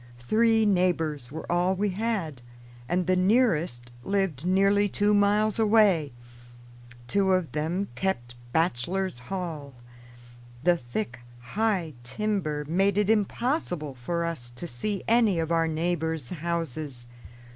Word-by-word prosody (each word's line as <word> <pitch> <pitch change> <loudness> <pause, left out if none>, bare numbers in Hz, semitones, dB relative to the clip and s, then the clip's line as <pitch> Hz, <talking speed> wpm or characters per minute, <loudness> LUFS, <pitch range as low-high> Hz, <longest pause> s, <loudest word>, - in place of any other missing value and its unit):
Three 220 - +3
neighbors 165 - +1
were 160 - -6
all 180 +2 +2
we 205 +2 0
had, 190 - -2 0.5
and 180 +1 +1
the 185 - +2
nearest 180 - +2
lived 180 -2 -1
nearly 200 +2 +3
two 205 +2 +2
miles 210 +1 +3
away. 210 -9 +4 1.0
Two 190 +6 +2
of 180 -7 0
them 165 +7 -1
kept 120 -11 -2 0.2
bachelor's 170 +3 0
hall. 160 -8 -5 0.9
The 175 0 +4
thick, 120 -2 -5 0.3
high 200 -7 0
timber 155 - -2
made 195 +4 +2
it 210 0 +3
impossible 210 - -1
for 170 +8 -2
us 155 -8 -4
to 125 - -6
see 190 - -3
any 225 -5 +4
of 165 0 -1
our 165 -1 +2
neighbors' 160 -3 -2
houses. 155 -6 -4
175 Hz, 125 wpm, -27 LUFS, 150-200 Hz, 1.0 s, away